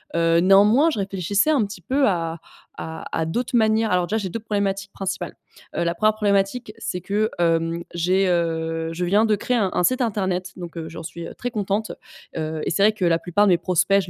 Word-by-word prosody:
Heu, 165 0 +3
néanmoins, 205 - +5
je 255 - -3
réfléchissais 195 - 0
un 275 -8 +3
petit 200 -2 -9
peu 270 - +1
à 165 -3 -1 0.4
à 160 0 -6
à 160 - 0
d'autres 240 +9 -1
manières. 220 0 +2
Alors 180 -1 +2
déjà, 220 +4 0
j'ai 195 -4 -3
2 230 - -4
problématiques 200 -2 -2
principales. 190 -2 -4 0.4
Heu, - - 0
la 170 0 0
1re 215 +4 +3
problématique, 210 +2 0
c'est 180 -5 -4
que, 210 +4 0
hem, 165 0 +1
j'ai, 185 +3 +2
heu 165 -1 -1
je 180 +2 -3
viens 205 +5 +3
de 215 -1 +3
créer 245 +5 -1
un 200 -4 +1
un - - +1
site 255 +8 +2
internet. 190 -5 -1
Donc 175 -2 -8
heu, 160 -1 -5
j'en 165 0 -8
suis, 170 +1 -7
heu, - - -9
très 245 -1 -4
contente. 210 0 -2 0.5
Heu, 155 0 -3
et - - -1
c'est 185 +4 +1
vrai 215 +1 +5
que 210 - -5
la 165 -1 +3
plupart 190 +5 +2
de 190 - +5
mes 175 - +5
prospects, 195 +3 +2
je 180 - -8
195 Hz, 225 wpm, -22 LUFS, 170-215 Hz, 0.5 s, néanmoins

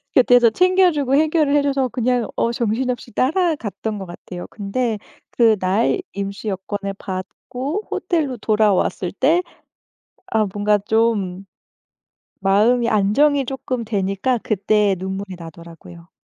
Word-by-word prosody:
곁에서 245 -2 +6
챙겨주고 355 -5 +3
해결을 305 -1 +2
해줘서 280 -2 +1
그냥 245 -1 0
어 230 - +1
정신없이 240 +2 -2
따라갔던 265 - -1
것 195 - -6
같아요. 175 0 -9
근데 220 +2 -2 0.3
그날 220 - +2
임시 200 +2 -5
여권을 195 +1 -4
받고 255 - -5
호텔로 300 -8 -1
돌아왔을 210 -4 +1
때 310 - +2 0.9
아 220 -1 +2
뭔가 210 0 +2
좀 205 -3 0 1.0
마음이 225 +5 +3
안정이 265 +7 +3
쪼끔 255 -2 -4
되니까 205 +4 -1
그때 210 -1 +2
눈물이 190 0 -5
나더라고요. 170 +1 -12
220 Hz, 265 characters per minute, -20 LUFS, 195-260 Hz, 1.0 s, 곁에서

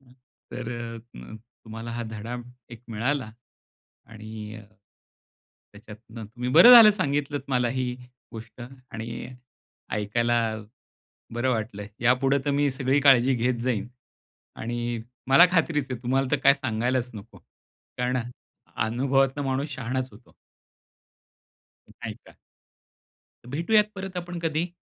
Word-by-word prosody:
तर 125 -1 -11
अ, 115 - -8
म 60 - -10 0.3
तुम्हाला 115 +1 -7
हा 120 0 -3
धडा 115 +3 -5 0.3
एक 115 -1 -11
मिळाला 120 +2 -1 0.8
आणि 110 0 -9 1.1
त्याच्यातनं 110 +2 -11
तुम्ही 120 +4 -6
बरं 175 - +9
झालं 230 -3 +11
सांगितलंत 145 -6 -1
मला 125 -2 +1
ही 125 -1 -1 0.4
गोष्ट 115 +2 -10 0.3
आणि 115 +2 -6 0.6
ऐकायला 115 +3 0 1.0
बरं 120 +2 0
वाटलं. 110 -3 -3
यापुढं 130 +3 +3
तर 145 - 0
मी 140 0 +2
सगळी 135 +1 +1
काळजी 135 -2 +5
घेत 120 0 0
जाईन 120 -4 -1 0.7
आणि 120 0 -3 0.3
मला 140 +7 +8
खात्रीच 155 -5 +1
आहे 125 - -3
तुम्हाला 130 +2 +1
तर 145 - +3
काय 140 - +8
सांगायलाच 125 -1 -1
नको. 105 +1 -11 0.6
कारण 125 +1 0 0.6
अनुभवातून 135 +5 +1
माणूस 135 +3 -1
शहाणाच 130 +1 -3
होतो. 115 +3 -19 1.5
नाही - - -8
का. - - -16 1.2
भेटूयात 190 - +3
परत 190 -1 -7
आपण 175 0 -5
कधी? 165 +2 -1
125 Hz, 115 wpm, -26 LUFS, 115-140 Hz, 1.5 s, झालं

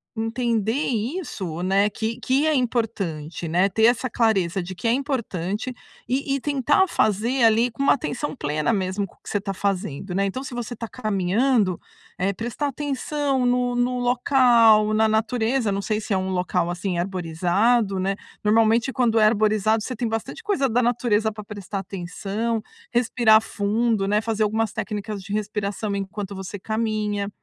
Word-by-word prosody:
entender 225 -1 0 0.2
isso, 220 - -3
né, 195 +2 +3
que 220 +2 -4
que 270 +4 +1
é 315 - +3
importante, 200 - -2
né. 180 +5 +2
Ter 220 +3 0
essa 245 +2 +3
clareza 195 -6 +1
de 185 +2 -7
que 175 - -10
é 230 - +4
importante, 235 - -2 0.3
e 275 +2 0
e - - -1
tentar 290 +6 +2
fazer, 230 - +1
ali, 230 +2 +4
com 230 +5 -7
uma 275 - +5
atenção 285 +2 -3
plena 155 - -1
mesmo 195 0 -1
com - - -23
o - - -34
que - - -9
você 205 - 0
está 195 0 -3
fazendo, 190 -3 -2
né. 195 +2 +1
Então 255 +8 -3
se 265 - -7
você 240 0 -4
está 235 0 -6
caminhando, 215 -1 +1 0.4
eh, 190 +2 0
prestar 240 +8 -3
atenção 280 -1 -1
no 245 0 +1
no 245 +1 0
local, 240 -4 +4
na 220 +1 +3
natureza 225 +1 +1
não 195 0 -1
sei 215 +1 -1
se 215 - -8
é 190 - +2
um 190 0 -2
local, 180 -1 0
assim, 180 +1 -2
arborizado, 190 +5 +1
né. 195 +1 0 0.3
Normalmente 225 +3 +3
quando 235 -3 +1
é 215 - +5
arborizado, 215 0 +2
você 255 +4 -4
tem 235 0 -2
bastante 225 - -4
coisa 390 -11 +1
da 245 +1 +2
natureza 230 -2 +1
pra 210 0 -9
prestar 200 -1 -6
atenção. 200 +4 -3 0.3
Respirar 235 -2 +4
fundo, 215 0 0
né, 210 +1 +3
fazer 220 0 -1
algumas 220 0 0
técnicas 210 -1 -4
de 195 - -9
respiração 210 0 -2
enquanto 200 0 -5
você 190 +1 -6
caminha. 215 -1 -1
220 Hz, 170 wpm, -23 LUFS, 195-245 Hz, 0.4 s, uma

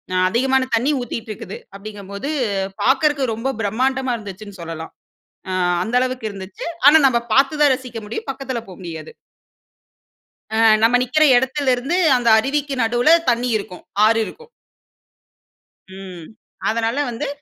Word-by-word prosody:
ஆ - - +2
அதிகமான 260 +4 +1
தண்ணி 245 +6 +2
ஊத்திட்டு 230 -1 -6
இருக்குது. 195 -1 -8 0.2
அப்படீங்கம்போது, 200 +3 -7 0.5
பார்க்கறக்கு 280 +1 +2
ரொம்ப 230 +5 -3
பிரமாண்டமா 255 +5 0
இருந்துச்சுன்னு 205 -2 -10
சொல்லலாம். 165 -1 -7 0.6
ஆ - - -3 0.3
அந்த 230 +4 -3
அளவுக்கு 255 -2 -2
இருந்துச்சு. 190 -2 -8 0.2
ஆனா 310 +2 +9
நம்ம 240 -2 +2
பார்த்து 275 +3 +3
தான் 290 -2 +6
ரசிக்க 250 -3 -9
முடியும். 220 - -6
பக்கத்தில 270 -2 -4
போ 185 - -10
முடியாது. 160 -3 -8 1.4
அ - - 0 0.3
நம்ம 235 +2 +5
நிக்கிற 280 +5 +2
இடத்திலருந்து 265 +4 0 0.2
அந்த 245 -1 -3
அருவிக்கு 280 +3 -1
நடுவுல 240 +8 +4
தண்ணி 245 +1 +1
இருக்கும். 185 -3 -9 0.2
ஆறு 225 +1 +3
இருக்கும். 470 - -12 1.5
ம். 185 -4 -10 0.4
அதனால 230 +3 -1
வந்து 280 +6 -4
240 Hz, 130 wpm, -20 LUFS, 205-265 Hz, 1.5 s, ஆனா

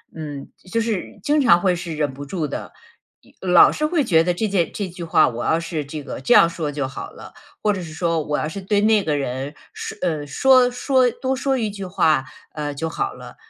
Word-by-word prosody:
嗯， 145 -3 -7 0.2
就 230 - +1
是 220 -3 -3
经 300 +1 +2
常 175 -10 +5
会 185 -1 +2
是 170 -2 -5
忍 150 -2 -1
不 140 +2 -8
住 155 +1 -3
的， - - -6 0.5
又 190 - -12
老 180 -1 +7
是 305 - -1
会 310 -1 +1
觉 165 -9 +4
得 180 +1 +1
这 215 +5 -1
件 190 -5 0
这 200 - -3
句 175 0 -8
话 165 - +4
我 120 0 -5
要 160 - +2
是 165 -3 -4
这 150 +1 -7
个 140 - -6
这 135 - +2
样 170 - +7
说 165 -3 -3
就 140 -2 -2
好 135 - -8
了， - - -12 0.3
或 210 - +2
者 190 - -4
是 160 -2 -9
说 165 -1 0
我 150 0 -2
要 - - -2
是 180 - -6
对 200 +2 +1
那 215 -1 +4
个 155 -3 0
人 135 +1 -3 0.2
说 - - -7
呃， 155 -5 -1
说 255 - +4
说 255 0 +2
多 260 +3 -2
说 270 +1 0
一 220 -2 -1
句 200 -1 -7
话， 155 -6 +2 0.3
呃， 150 -1 -4
就 160 +3 -3
好 400 - -2
了。 - - -11
170 Hz, 255 characters per minute, -21 LUFS, 150-215 Hz, 0.5 s, 老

